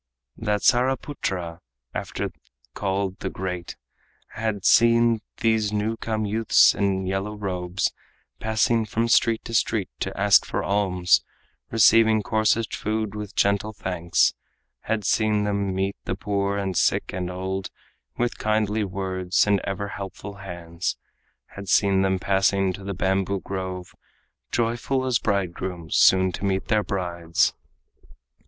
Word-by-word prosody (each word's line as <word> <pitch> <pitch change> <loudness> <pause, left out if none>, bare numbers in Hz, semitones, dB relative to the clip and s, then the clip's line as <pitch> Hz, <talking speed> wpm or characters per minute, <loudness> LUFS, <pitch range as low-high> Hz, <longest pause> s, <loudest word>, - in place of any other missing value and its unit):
That 105 -2 -1
Saraputra 120 - 0 0.3
after - - -4 0.4
called 95 -1 -2
the - - -3
Great 90 -2 -5 0.5
Had 105 -2 -3
seen 115 -1 +5 0.2
these 110 -2 +2
new 105 +2 -1
come 110 -1 -2
youths 110 +2 +4
in 95 -2 0
yellow 95 +3 -2
robes 90 -2 -2 0.5
Passing 110 0 +1
from 115 +2 0
street 115 -1 +3
to 115 - -7
street 110 -3 +1
to - - -4
ask 100 0 +6
for - - -3
alms, 95 -3 +2 0.5
Receiving 110 0 +5
coarsest 110 +1 +1
food 110 -1 -2
with 105 -1 -7
gentle 100 +2 +1
thanks 90 -4 +1 0.5
Had 110 -2 -2
seen 105 -1 +2
them 100 -1 -1
meet 95 +1 -1
the 95 - -2
poor 100 0 -1
and 95 -2 -2
sick - - +1
and 90 -1 -3
old 95 +1 -4 0.5
With 120 0 -1
kindly 110 0 +1
words 95 -1 0
and 100 -1 +3
ever 100 +1 -3
helpful 100 0 -7
hands 85 -3 -5 0.5
Had 100 -2 -9
seen 95 0 +4
them 95 0 +2
passing 95 0 +1
to 100 - -9
the 100 0 -4
bamboo 95 +1 0
grove 95 -2 -5 0.6
Joyful 120 +3 0
as 125 -2 +2
bridegrooms 90 -4 -2
soon 95 0 +5
to 90 - -7
meet 95 -1 -1
their 110 -2 +3
brides. 85 -4 0
100 Hz, 135 wpm, -24 LUFS, 95-110 Hz, 0.6 s, ask